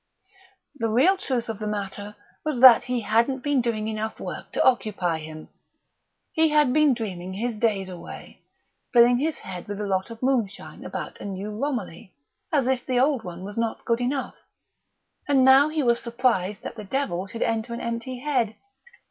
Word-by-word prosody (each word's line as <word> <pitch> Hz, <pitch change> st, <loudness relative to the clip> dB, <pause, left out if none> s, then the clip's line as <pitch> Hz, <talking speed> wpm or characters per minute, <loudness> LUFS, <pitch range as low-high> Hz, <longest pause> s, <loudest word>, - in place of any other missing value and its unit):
Pshaw! -, -, -30 dB, 0.4 s
The 225 Hz, -1 st, 0 dB
real 270 Hz, -, +4 dB
truth 255 Hz, -, -2 dB
of 225 Hz, -2 st, -5 dB
the 215 Hz, -, -3 dB
matter 205 Hz, 0 st, -5 dB, 0.3 s
was 305 Hz, -5 st, -1 dB
that 255 Hz, -2 st, +9 dB
he 250 Hz, -1 st, -1 dB
hadn't 235 Hz, +5 st, +1 dB
been 290 Hz, -3 st, +2 dB
doing 220 Hz, -2 st, -1 dB
enough 220 Hz, 0 st, -4 dB
work -, -, -7 dB
to -, -, +2 dB
occupy 210 Hz, -9 st, +1 dB
him. 155 Hz, 0 st, -9 dB, 0.9 s
He 320 Hz, -2 st, +3 dB
had 300 Hz, -4 st, +3 dB
been 300 Hz, -3 st, +4 dB
dreaming 190 Hz, -5 st, -5 dB
his 230 Hz, +4 st, -2 dB
days 210 Hz, -4 st, 0 dB
away, 180 Hz, -2 st, -10 dB, 0.5 s
filling 245 Hz, 0 st, +6 dB
his 310 Hz, +3 st, -1 dB
head 185 Hz, +1 st, -7 dB
with 205 Hz, 0 st, -5 dB
a 210 Hz, -, -2 dB
lot 190 Hz, 0 st, -1 dB
of 230 Hz, +1 st, -10 dB
moonshine 240 Hz, -7 st, -1 dB
about -, -, -6 dB
a -, -, -7 dB
new 200 Hz, +1 st, -5 dB
Romilly 210 Hz, -, -4 dB, 0.4 s
(as 275 Hz, -5 st, +2 dB
if 260 Hz, -2 st, +1 dB
the 250 Hz, -1 st, 0 dB
old 265 Hz, -2 st, +2 dB
one 180 Hz, 0 st, -8 dB
was 205 Hz, +3 st, -5 dB
not 230 Hz, -1 st, -2 dB
good 235 Hz, +1 st, +1 dB
enough), 265 Hz, +2 st, -2 dB, 0.9 s
and 270 Hz, -3 st, +4 dB
now 270 Hz, +3 st, +7 dB
he 310 Hz, -1 st, -1 dB
was 235 Hz, -1 st, +3 dB
surprised 230 Hz, -5 st, 0 dB
that 235 Hz, -, -7 dB
the 215 Hz, -, -6 dB
devil 195 Hz, -5 st, -2 dB
should 230 Hz, +4 st, -3 dB
enter 225 Hz, +1 st, -1 dB
an 235 Hz, -, -4 dB
empty 235 Hz, +2 st, -4 dB
head! 245 Hz, -5 st, -1 dB
235 Hz, 185 wpm, -25 LUFS, 205-260 Hz, 0.9 s, that